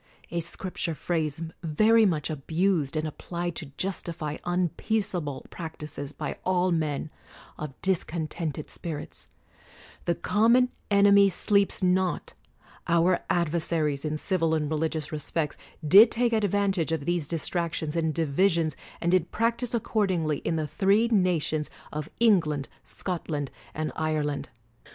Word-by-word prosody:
(a 170 - -1
Scripture 170 0 -3
phrase 160 -2 -1 0.2
very 215 +7 +4
much 160 -4 -1
abused, 160 +1 0
and 155 0 -1
applied 175 +2 -4
to 155 - -6
justify 170 -5 -3
unpeaceable 175 -3 -1
prac 160 -2 -7
tises 145 -2 -6
by - - -5
all 185 0 +2
men 155 -2 -1 0.5
of 150 -3 -6
discontented 160 -4 -2
spirits), 160 -4 -6 0.4
— - - -22
the 170 - +1
common 235 +7 +3 0.2
enemy 200 -1 +6
sleeps 200 +1 +2
not: 185 0 +1 0.5
our 170 +1 +3
adversaries 160 -4 0
in 155 0 -1
civil 165 -2 +1
and 150 -1 -1
religious 155 0 -1
respects 150 0 -2 0.3
did 205 +8 +9
take 235 0 +1
advantage 200 -5 +1
of 160 -3 -1
these 175 -3 0
distractions 165 -1 -2
and 160 -2 0
divisions, 165 0 +2 0.3
and 175 - +1
did 180 -2 +2
prac 230 +1 0
tise 245 -1 -1
accordingly 185 -9 0
in 165 - -1
the 155 -1 -1
three 200 +8 +2
nations 175 -7 +1 0.2
of 150 0 -4
Eng 225 -5 +6
land, 145 -2 -2 0.2
Scotland, 160 -6 -4 0.2
and 155 0 -2
Ireland. 155 -2 -1
170 Hz, 130 wpm, -27 LUFS, 155-190 Hz, 0.5 s, did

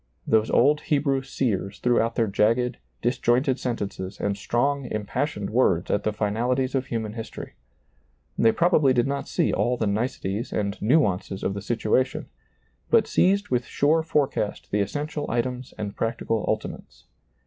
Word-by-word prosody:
Those 110 0 +2
old 145 +4 +4
Hebrew 140 -2 +1
seers 105 -6 -2
threw 120 -1 +2
out 115 +1 -1
their 115 - +2
jagged, 115 +4 +1 0.3
disjointed 130 +2 +2
sentences 100 -5 -4
and 100 -1 0
strong, 135 +7 0
impassioned 105 +1 -3
words 110 -7 +2
at 100 - +1
the 110 - +1
finalities 120 +5 0
of 130 -1 -1
human 110 -3 -3
history. 115 -1 -7 0.8
They 115 - +4
probably 155 -5 +3
did 120 -1 +2
not 140 0 -3
see - - +1
all 125 +1 +1
the 110 - 0
niceties 105 0 -2
and 100 -1 -1
nuances 105 - +1
of 95 - 0
the 100 - -5
situation, 120 +4 0 0.6
but - - +5
seized 200 +2 +2
with 125 -1 0
sure 155 +3 +2
forecast 145 -8 -1
the 105 - +1
essential 145 +8 -3
items 125 +1 -2
and 105 -1 -5
practical 115 -1 -1
ultimates. - - -4
120 Hz, 150 wpm, -25 LUFS, 105-135 Hz, 0.8 s, but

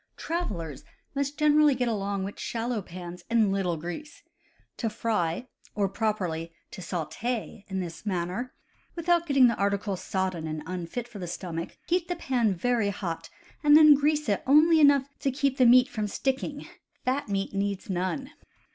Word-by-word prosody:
Travelers 180 - -4 0.3
must 280 +1 -2
generally 300 -1 +5
get 250 -1 0
along 200 -3 -1
with 200 +1 -6
shallow 230 -1 -2
pans 175 -1 -9
and 225 -4 +3
little 185 -4 0
grease. 175 - -7 0.5
To 230 - -1
fry 210 -1 -1 0.3
(or, 200 -2 +2
properly, 185 -6 -2 0.2
to - - -8
saute) 200 +6 -4
in 190 -1 -2
this 170 -2 -7
manner, 190 +5 -2 0.4
without 340 0 +1
getting 275 -3 +6
the 235 - +4
article 200 0 0
sodden 185 -3 -2
and 155 -1 -4
unfit 185 +7 -4
for 230 -4 -10
the 180 - -5
stomach, 170 -1 -5
heat 350 0 +1
the 355 - -2
dry 345 - -13
pan 235 -7 +2
very 230 +2 +1
hot, 165 -4 -4 0.3
and 295 0 +8
then 305 -1 +9
grease 295 +1 +1
it 200 -2 +1
only 315 +4 +6
enough 285 -2 +5
to 275 - 0
keep 275 0 0
the 255 - +6
meat 250 +1 +7
from 215 -1 -3
sticking 270 +6 -2 0.4
(fat 260 -1 0
meat 195 0 -2
needs 200 +1 -2
none). 190 +9 -2
215 Hz, 165 wpm, -27 LUFS, 185-275 Hz, 0.5 s, then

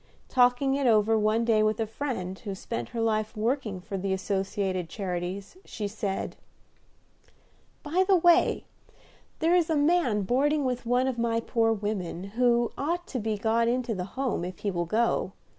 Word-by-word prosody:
Talking 250 +2 +3
it 275 -1 +1
over 220 -1 +4
one 215 +2 +2
day 220 -2 +3
with 215 0 +1
a 225 - +1
friend, 215 -6 -4
who 200 -3 -5
spent 120 -10 -5
her 235 - -5
life 215 0 0
working 225 -3 -1
for 195 +2 -5
the 195 +1 -1
Associated 190 -2 -2
Charities, 190 - -4
she 210 - -5
said, 200 -2 -4 1.5
"By 335 +5 +2
the 390 - +5
way, 345 -1 +4 0.7
there 330 +2 +2
is 350 -3 +3
a 320 - +2
man 290 - +2
boarding 280 +7 +1
with 250 -2 -2
one 250 +2 +2
of 255 -3 -2
my 230 -1 +1
poor 225 0 +1
women, 205 -5 -3
who 235 +1 +2
ought 345 +5 -1
to 255 - -3
be 215 -1 -2
got 225 +2 +1
into 245 -1 0
the 180 -3 -3
Home, 260 -9 -1
if 180 0 -5
he 205 - -2
will 175 -1 -1
go. 220 -1 +1
225 Hz, 175 wpm, -27 LUFS, 200-255 Hz, 1.5 s, the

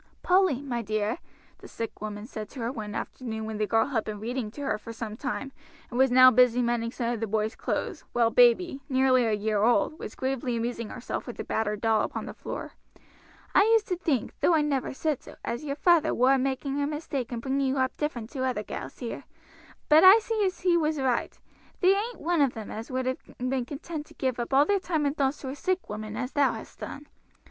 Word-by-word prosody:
"Polly, 360 -7 +3
my 240 -4 -2
dear," 215 +4 -1 0.4
the - - -11
sick 230 -2 -6
woman 210 0 -5
said 215 -3 -7
to 270 - -10
her 230 +1 -1
one 210 -4 -6
afternoon 220 -4 -5
when 220 -1 -5
the 210 - +1
girl 225 +1 +3
had 250 -6 -1
been 210 -1 -5
reading 235 +1 -3
to 265 +7 -9
her 215 -7 -1
for 230 - -8
some 225 -1 -6
time, 270 +2 -4 0.4
and 245 - -2
was 265 0 +5
now 255 +1 +8
busy 250 0 +5
mending 235 -1 0
some 235 -1 -2
of 235 - -4
the 225 - -2
boys' 215 +2 -1
clothes, - - -3
while 230 -1 +2
baby, 260 +6 +4
nearly 260 -2 +4
a 225 - +1
year 210 0 0
old, 240 +7 +2
was - - -7
gravely 260 -2 -2
amusing 230 -1 -3
herself 245 - -5
with 240 - -7
a - - -2
battered 210 -1 -2
doll 225 -2 +3
upon - - -3
the - - -7
floor, - - -6 0.8
"I - - +6
used 445 0 +3
to 365 - +1
think, 300 - -1
though 345 - +4
I 310 - +4
never 280 -3 -1
said 295 0 -1
so, - - -12
as 240 +6 -3
your 280 -1 -2
feyther 340 +2 +3
war 260 +2 +5
making 270 +2 -1
a 285 - +1
mistake 295 -5 -4
in 240 - -3
bringing 270 +2 0
you 265 +1 0
up 260 -1 0
different 250 -7 -3
to 265 -3 -3
other 250 -5 -1
gals 135 -8 -7
here; 235 - -6 0.6
but 305 +1 +7
I 380 +3 +10
see 445 -1 -1
as 370 - -5
he 355 -1 +3
was 310 -2 +1
right. 255 -3 -1 0.4
There 380 +1 +5
ain't 455 +4 -3
one 340 -1 +1
of 275 -3 +2
them 220 -2 -7
as 220 +1 -6
would 255 0 -2
have 260 0 -1 0.2
been 255 0 -1
content 300 +3 -6
to - - -17
give 260 -3 -1
up 240 - -3
all 275 +2 +5
their 405 +2 +2
time 325 -5 -1
and 285 +1 0
thoughts 275 -1 0
to 265 - -5
a 265 - -5
sick 370 +5 -2
woman 215 0 -5
as 255 +1 -3
thou 285 -2 +3
hast - - -10
done. 285 - -7
255 Hz, 235 wpm, -27 LUFS, 230-290 Hz, 0.8 s, I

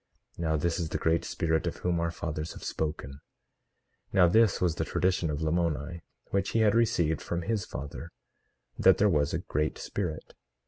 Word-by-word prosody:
Now 80 -2 0
this 85 +4 0
is 80 -2 -2
the - - -1
Great 80 +1 +1
Spirit 80 -3 0
of - - -3
whom 90 -1 +2
our 85 0 0
fathers 80 -2 -4
have - - -11
spoken. 70 -3 -4 0.9
18:5 - - -32
Now 90 -3 +6
this 110 +3 +4
was 90 -3 +2
the - - -2
tradition 90 -1 0
of 75 +1 -2
Lamoni, 85 0 -1 0.3
which 100 -1 +1
he - - +4
had 105 -2 +4
received 85 -9 +2
from 85 0 -3
his 105 +1 -1
father, 70 +4 -7 0.7
that - - +6
there 105 - +4
was 75 -6 +2
a - - 0
Great 75 +1 -1
Spirit. 85 -6 -4
85 Hz, 185 wpm, -29 LUFS, 80-90 Hz, 0.9 s, Now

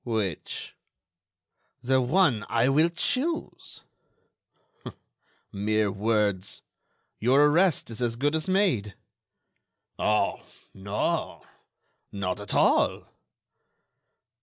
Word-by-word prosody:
"Which?" 110 -8 -3 1.1
"The 130 +1 +2
one 130 - +2
I 120 +2 +2
will 155 +5 +4
choose." 285 - -2 1.7
"Mere 105 0 0
words! 105 -2 -1 0.6
Your 135 +6 +4
arrest 165 -3 +2
is 115 - -7
as 120 -1 0
good 145 +5 0
as 160 +2 -2
made." 170 - +1 1.0
"Oh! 105 -1 +1 0.3
no—not 100 -1 -5
at 100 -1 -5
all." - - +2
115 Hz, 80 wpm, -26 LUFS, 105-150 Hz, 1.7 s, will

